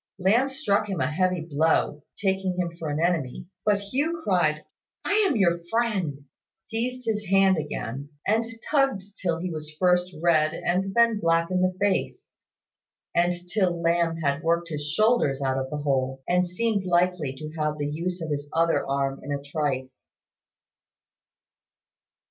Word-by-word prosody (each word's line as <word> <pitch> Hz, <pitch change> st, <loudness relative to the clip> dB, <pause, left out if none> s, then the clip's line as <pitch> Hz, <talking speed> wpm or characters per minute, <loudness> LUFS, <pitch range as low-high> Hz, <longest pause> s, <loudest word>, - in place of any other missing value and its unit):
Lamb 220 Hz, +8 st, +3 dB
struck 210 Hz, -6 st, 0 dB
him 190 Hz, -4 st, -2 dB
a -, -, 0 dB
heavy 180 Hz, +1 st, +1 dB
blow, 155 Hz, -1 st, +1 dB, 0.2 s
taking 190 Hz, -2 st, 0 dB
him 175 Hz, -2 st, -1 dB
for 160 Hz, -, -3 dB
an 145 Hz, +1 st, -1 dB
enemy; 165 Hz, -7 st, 0 dB, 0.2 s
but 205 Hz, -1 st, +3 dB
Hugh 290 Hz, +11 st, -1 dB
cried 155 Hz, -6 st, +1 dB, 0.4 s
"I -, -, -1 dB, 0.2 s
am 285 Hz, -, 0 dB
your 170 Hz, -4 st, +2 dB
friend," 190 Hz, -12 st, -1 dB, 0.3 s
seized 235 Hz, +5 st, -4 dB
his 210 Hz, -3 st, -1 dB
hand 195 Hz, -2 st, +4 dB
again, 140 Hz, -2 st, -5 dB, 0.2 s
and 220 Hz, +3 st, +2 dB, 0.3 s
tugged 270 Hz, -9 st, +2 dB, 0.2 s
till 175 Hz, -3 st, 0 dB
he 180 Hz, +2 st, -4 dB
was 155 Hz, -1 st, -6 dB
first 180 Hz, 0 st, +2 dB
red 155 Hz, -2 st, +3 dB
and 190 Hz, +3 st, -1 dB
then 235 Hz, -2 st, +4 dB
black 165 Hz, -1 st, +2 dB
in 185 Hz, 0 st, +1 dB
the 185 Hz, 0 st, +1 dB
face, 200 Hz, -1 st, -1 dB, 0.8 s
and 175 Hz, +1 st, +1 dB
till 180 Hz, -3 st, +1 dB
Lamb 170 Hz, 0 st, +1 dB
had 140 Hz, +1 st, +1 dB
worked 170 Hz, 0 st, +1 dB
his 150 Hz, -2 st, -4 dB
shoulders 215 Hz, -, +2 dB
out 135 Hz, -1 st, 0 dB
of 130 Hz, 0 st, -4 dB
the 150 Hz, -, -3 dB
hole, 135 Hz, -2 st, -1 dB
and 180 Hz, 0 st, +2 dB
seemed 205 Hz, +2 st, 0 dB
likely 175 Hz, -6 st, +1 dB
to 155 Hz, +3 st, -7 dB
have 150 Hz, 0 st, 0 dB
the 145 Hz, -, -2 dB
use 170 Hz, +4 st, -3 dB
of 155 Hz, -, -4 dB
his 145 Hz, 0 st, -3 dB
other 165 Hz, 0 st, +2 dB
arm 135 Hz, 0 st, -1 dB
in 145 Hz, -, -6 dB
a 140 Hz, -, -1 dB
trice. 140 Hz, -3 st, -3 dB
175 Hz, 160 wpm, -26 LUFS, 150-195 Hz, 0.8 s, hand